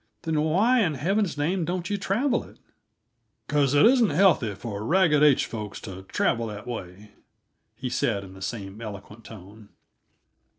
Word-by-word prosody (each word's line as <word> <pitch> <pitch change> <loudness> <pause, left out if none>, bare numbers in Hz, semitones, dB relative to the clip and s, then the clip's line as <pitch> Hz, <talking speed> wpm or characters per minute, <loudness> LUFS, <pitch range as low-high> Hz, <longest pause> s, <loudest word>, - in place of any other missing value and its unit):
"Then 160 -2 0
why 200 +11 +3
in 170 -9 +1
Heaven's 190 - 0
name 170 +5 0
don't 175 +1 -3
you 205 - -1
travel 205 +8 0
it?" - - -16 0.9
"Because 145 -2 +1
it 145 - +6
isn't 240 -3 +5
healthy 160 - +3
for 105 0 -6
Ragged 160 +2 +3
H 150 -3 +5
folks 105 -3 -6
to 95 -3 -8
travel 115 0 0
that 105 -1 -8
way," 100 -3 -8 0.6
he 130 - -5
said, 120 -5 -1
in 95 -1 -12
the 95 - -13
same 100 0 -6
eloquent 105 +1 -9
tone. 105 0 -13
130 Hz, 160 wpm, -25 LUFS, -, 0.9 s, it